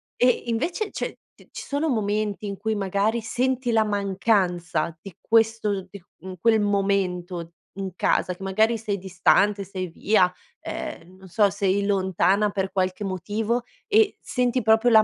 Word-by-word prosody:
E 250 0 +3
invece 335 - -1
cioè - - -3 0.2
t - - -21
ci - - -7
sono 290 +3 -1
momenti 210 -2 -1
in 200 -1 -4
cui 220 +1 -1
magari 205 +3 0
senti 250 +2 -1
la 220 -1 +4
mancanza 190 -5 0
di 195 -4 -11
questo 225 -3 +2
di, 200 -1 -11 0.2
mhmm, 185 0 -8
quel 220 +2 +4
momento 185 -4 -1 0.2
in 195 -1 -4
casa 180 - +1
che 190 - -11
magari 220 +4 +2
sei 210 -2 -3
distante, 195 +2 +2
sei 185 -1 -5
via, 180 +1 +2 0.3
ehm 185 +2 -7
non 190 0 -14
so 205 +3 +3
sei 200 0 0
lontana 195 +1 +2
per 190 -1 -2
qualche 185 +1 -1
motivo 210 +5 -2 0.2
e 435 -1 +3
senti 250 0 0
proprio 225 +2 +4
la 220 -1 +7
200 Hz, 155 wpm, -24 LUFS, 190-225 Hz, 0.3 s, la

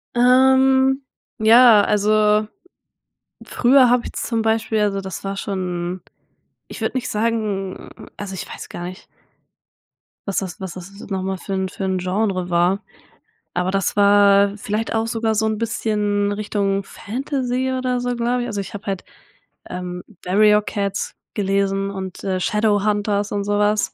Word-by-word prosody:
Ähm, 265 +2 +4 0.4
ja, 225 0 +7
also 210 +1 +2 1.0
früher 255 +1 +4
habe 245 0 +3
ich - - -7
zum 230 -1 -2
Beispiel 220 0 0
also 200 -1 +1
das 190 -1 -7
war 195 0 -4
schon 180 -2 -3 0.7
ich - - -9
würde - - -1
nicht 255 - -2
sagen 210 -3 -2 0.3
also 195 -2 -6
ich - - -6
weiß - - -9
gar 175 - -7
nicht 185 +1 -9 1.2
was 195 - -2
das 190 +1 -3
was 190 -3 -6
das 185 +1 -10
n - - -10
noch 190 -1 -2
mal 190 0 -2
für 195 - -6
'n 190 0 -1
für 195 - -7
'n 190 -1 0
Genre 185 -1 -1
war, 180 +4 +2 0.7
aber 180 +1 0
das 195 -1 0
war 200 0 +5
vielleicht 215 +2 -3
auch 225 0 0
sogar 225 -1 0
so 220 +1 +1
'n 215 -1 -1
bisschen 210 -3 0
Richtung 200 -1 -1
Fantasy 260 +3 -3
oder 255 -1 -1
so, 245 0 -2
glaube 240 +1 0
ich. - - -4
Also 200 -1 -3
ich 195 - -9
habe 205 - -8
halt, 195 -2 -3 0.7
ähm, 180 0 -5 0.2
„Warrior 210 +3 +4
Cats"gelesen 195 -1 -2
und 190 -2 -6 0.2
„Shadow 210 0 +1
Hunters" 205 -1 0
und 200 - -1
so 205 0 0
was. 210 0 +1
205 Hz, 155 wpm, -21 LUFS, 195-225 Hz, 1.2 s, ja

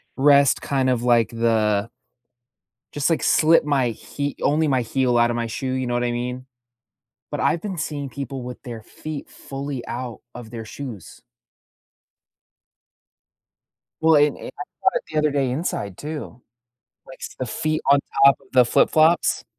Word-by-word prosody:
rest, 140 -1 +4
kind 135 -2 0
of 120 -2 0
like, 120 -2 +3
the 110 -2 +1 1.0
Just, 145 +2 0
like, 165 - 0
slip 165 +1 +4
my 135 -5 +1
hee 140 +5 -5
only 155 +2 +2
my 130 -3 +2
heel 125 +1 +1
out 120 0 +4
of 120 - -1
my 115 -1 -2
shoe, 130 +3 -4
you 130 -1 -2
know 120 - -2
what 120 0 0
I 120 - 0
mean, 125 +1 -4 0.9
but - - -3
I've 165 - +1
been 190 -5 -5
seeing 145 -1 -3
people 135 -1 -6
with 125 0 -8
their 120 -4 -8
feet 155 +5 -8
fully 135 -2 -6
out 120 -1 -5
of 120 -3 -9
their 115 -1 -7
shoes. 120 -3 -9 2.8
Well, 160 0 +5
and 145 0 +4
and - - -9
I - - -7 0.2
saw - - +5
it - - -6
the - - -3
other 150 - +2
day 135 -3 0
inside, 125 - -3
too, 150 -5 -7 0.7
like, 130 - -13 0.2
the 130 - -3
feet 155 +6 -1
on 140 0 +6 0.2
top 140 0 +7
of - - -23
the 125 -1 +6
flip 115 - +3
flops? 160 +2 +3
130 Hz, 170 wpm, -22 LUFS, 120-145 Hz, 2.8 s, top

